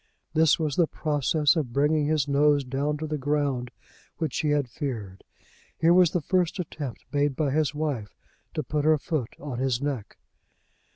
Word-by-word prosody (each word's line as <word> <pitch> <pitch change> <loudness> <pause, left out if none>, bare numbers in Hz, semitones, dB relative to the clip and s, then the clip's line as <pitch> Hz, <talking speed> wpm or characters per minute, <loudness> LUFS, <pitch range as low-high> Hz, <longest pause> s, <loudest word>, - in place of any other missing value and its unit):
This 160 -1 +4
was 155 -4 -2
the 170 - +4
process 150 +1 +1
of 140 -8 -2
bringing 150 +2 +2
his 150 -2 +1
nose 145 0 +3
down 140 +3 -1
to 155 - -4
the 150 -1 -3
ground 140 -3 0 0.5
which 160 -2 -2
he 150 - 0
had 145 -2 +1
feared. 115 -7 -5 0.5
Here 165 +1 +4
was 180 -2 +6
the 175 - -1
first 180 +3 +1
attempt 150 -7 -6
made 145 -1 +1
by 145 -2 0
his 150 0 +1
wife 140 -9 -3 0.4
to 155 - -1
put 150 +3 -1
her 155 0 +4
foot 145 -5 -3
on 135 -4 -5
his 130 -2 +1
neck. 140 -6 -4
145 Hz, 175 wpm, -26 LUFS, 135-155 Hz, 0.5 s, was